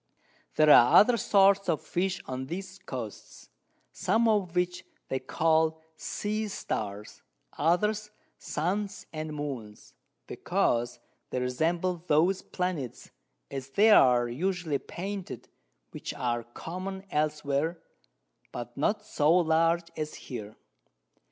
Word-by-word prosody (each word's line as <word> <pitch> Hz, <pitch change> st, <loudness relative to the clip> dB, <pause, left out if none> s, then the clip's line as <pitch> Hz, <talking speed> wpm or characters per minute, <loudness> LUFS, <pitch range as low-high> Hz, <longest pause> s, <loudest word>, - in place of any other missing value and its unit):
There 155 Hz, -1 st, +6 dB
are 120 Hz, -2 st, +8 dB
other 240 Hz, +4 st, +7 dB
Sorts 195 Hz, -2 st, +4 dB
of 160 Hz, -, +2 dB
Fish 185 Hz, +1 st, -2 dB
on 130 Hz, 0 st, -5 dB
these 185 Hz, +4 st, -6 dB
Coasts, 115 Hz, -6 st, -8 dB, 0.4 s
some 230 Hz, +1 st, +1 dB
of 200 Hz, -5 st, +1 dB
which 180 Hz, 0 st, 0 dB, 0.3 s
they 130 Hz, -, -1 dB
call 160 Hz, +1 st, +1 dB, 0.2 s
Sea 215 Hz, +5 st, -3 dB
Stars, 105 Hz, -, -5 dB, 0.3 s
others 210 Hz, +7 st, +1 dB, 0.3 s
Suns 195 Hz, +5 st, -2 dB
and 155 Hz, 0 st, -4 dB
Moons, 135 Hz, -8 st, -6 dB, 0.3 s
because 120 Hz, 0 st, 0 dB, 0.3 s
they 125 Hz, -, -2 dB
resemble 165 Hz, +7 st, -1 dB
those 175 Hz, +6 st, +3 dB
Planets, 180 Hz, -, -4 dB, 0.4 s
as 135 Hz, -1 st, -5 dB
they 210 Hz, +10 st, +5 dB
are 125 Hz, -, +6 dB
usually 165 Hz, +2 st, -1 dB
painted, 195 Hz, +1 st, -6 dB, 0.4 s
which -, -, -6 dB
are 120 Hz, -2 st, -2 dB
common 185 Hz, +10 st, -6 dB
elsewhere, 150 Hz, +1 st, 0 dB, 0.7 s
but 120 Hz, 0 st, -7 dB
not 210 Hz, +9 st, 0 dB
so 150 Hz, -6 st, +2 dB
large 165 Hz, 0 st, +3 dB
as 155 Hz, 0 st, -4 dB
here. 110 Hz, -5 st, -8 dB
160 Hz, 115 wpm, -28 LUFS, 135-190 Hz, 0.7 s, are